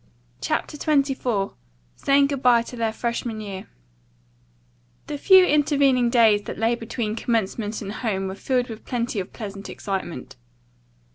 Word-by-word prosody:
CHAPTER 295 - -2
XXIV 270 -9 0 0.4
SAYING 280 0 +3
GOOD 275 -2 -2
BYE 240 -2 +5
TO 245 - -9
THEIR 225 -2 -1
FRESHMAN 235 -1 -3
YEAR 195 -3 -7 1.4
The 290 - -5
few 375 +2 +7
intervening 280 -5 +3
days 225 -4 +5
that - - -6
lay 225 +2 +2
between 225 -2 -3
commencement 220 -2 -1
and 200 - -5
home 205 -4 -2
were 190 - -4
filled 250 +4 -1
with 225 -1 -8
plenty 240 -3 -2
of 185 - -5
pleasant 200 -3 -7
excitement. 190 -8 -5
235 Hz, 140 wpm, -24 LUFS, 210-260 Hz, 1.4 s, few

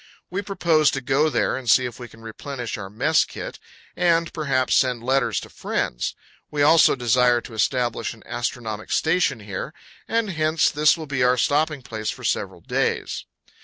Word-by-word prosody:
We 195 +3 -2
propose 170 -6 +2
to - - 0
go 140 +4 +2
there 125 - 0
and 130 -3 -4
see 125 +2 +5
if 120 0 -6
we 120 - -7
can 115 0 -17
replenish 120 +2 -6
our 95 -2 -7
mess 135 +10 +2
kit, - - -8 0.4
and 170 -2 +2
perhaps 135 -5 +1
send 125 -3 +2
letters 135 +1 +1
to - - -11
friends. - - -2 0.3
We 145 -1 0
also 160 +1 +6
desire 125 -1 +3
to 120 - -11
establish 120 0 0
an 110 - -19
astronomic 115 -3 -4
station 160 -8 +1
here; 100 -2 -6 0.3
and 225 -3 0
hence 155 -1 +2
this 150 +2 +4
will 160 - -6
be 140 -3 -2
our 125 0 +4
stopping 150 0 +1
place 110 -3 -4
for - - -6
several - - -2
days. - - -2
130 Hz, 175 wpm, -23 LUFS, 120-155 Hz, 0.4 s, also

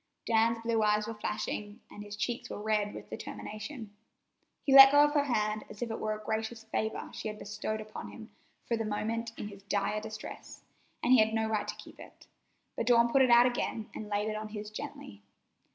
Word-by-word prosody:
Dan's 230 0 +3
blue 230 -1 +1
eyes 210 0 +2
were 225 - -4
flashing, 210 -1 -4
and 205 - -9
his 205 0 -8
cheeks 235 +3 -3
were - - -5
red 210 -1 0
with - - -10
determination. 215 0 -7 0.7
He 280 - 0
had 270 - +9
let 270 0 +12
go 290 0 +7
of 295 0 +2
her 290 -1 +3
hand 215 -4 0
as 210 - -6
if 230 - -4
it 225 - -4
were 215 0 -1
a 215 - -15
gracious 220 +1 -3
favor 220 0 -3
she - - -5
had 215 0 -5
bestowed 210 +1 -4
upon 215 0 -8
him - - -11 0.3
for 235 - 0
the 225 - -2
moment 225 +2 -2
in 205 - -5
his 200 -1 -12
dire 205 +1 -1
distress, 215 0 -9 0.4
and 245 - +5
he 255 - +7
had 220 +1 +3
no 220 0 +1
right 215 -1 -1
to - - -4
keep - - -13
it, - - -14 0.5
but - - -2
Dawn 235 -1 +5
put 270 - +5
it 255 - +5
out 240 0 +8
again 235 -3 -2
and 210 - -7
laid 205 +1 0
it 215 - -2
on 215 0 -4
his 210 0 -7
gently. 100 - -8
220 Hz, 220 wpm, -31 LUFS, 210-230 Hz, 0.7 s, let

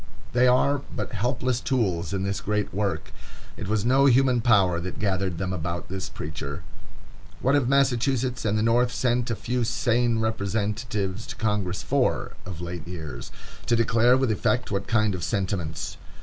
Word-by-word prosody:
They 125 +1 +5
are 140 +3 +3
but - - -3
helpless 125 +2 -1
tools 95 - 0
in 95 -1 -1
this 100 0 -2
great 105 0 -1
work. 100 0 -2 0.4
It - - -6
was 105 0 0
no 135 +3 +5
human 130 -1 +4
power 95 -7 +4
that 90 +1 -5
gathered 95 -3 -1
them 95 +1 -2
about 85 0 -4
this 95 0 -4
preacher. 75 -1 -6 0.8
What 135 - +2
have 140 -4 +3
Massachusetts 130 -2 +2
and 105 -1 +1
the 110 - +1
North 120 +2 +3
sent 125 -1 0
a 115 - 0
few 120 +4 -1
sane 120 +1 +1
representatives 105 -1 -2
to - - -6
Congress 105 -4 -1
for, - - +1 0.2
of 90 -3 -6
late 85 -2 -6
years?—to 80 - -5
declare 115 +2 +4
with 130 -3 +1
effect 125 +4 0
what 100 -1 -2
kind 110 -3 +2
of 90 -2 -4
sentiments? 95 -6 -2
110 Hz, 165 wpm, -25 LUFS, 95-125 Hz, 0.8 s, They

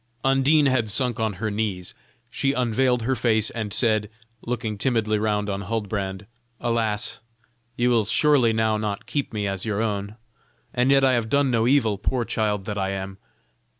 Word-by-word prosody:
Undine 135 +3 +4
had 130 -5 +1
sunk 125 +2 0
on 110 -2 0
her 110 +3 -3
knees: 100 -4 -3 0.4
she 135 0 0
unveiled 125 -1 +1
her 130 +3 +1
face 110 -3 +1
and 110 -3 -4
said, 110 -1 +1 0.3
looking 115 -3 -3
timidly 110 -1 0
round 105 -1 0
on 100 -1 -3
Huldbrand: 100 -2 -3 0.3
"Alas! 115 -3 -1 0.6
you 125 +1 +2
will 115 -3 +3
surely 125 +1 +3
now 110 -1 +1
not 105 -1 -3
keep 145 -2 -2
me 105 -2 -2
as 95 -2 -3
your 105 -2 -2
own; 105 -2 -2 0.6
and 125 +1 +2
yet 135 0 +5
I 130 -1 +4
have 115 -2 0
done 140 0 +2
no 115 -1 +2
evil, 115 -7 +2
poor 120 +3 -1
child 105 -4 -1
that 105 0 -3
I 95 0 -1
am!" 95 0 -5
110 Hz, 175 wpm, -24 LUFS, 105-125 Hz, 0.6 s, yet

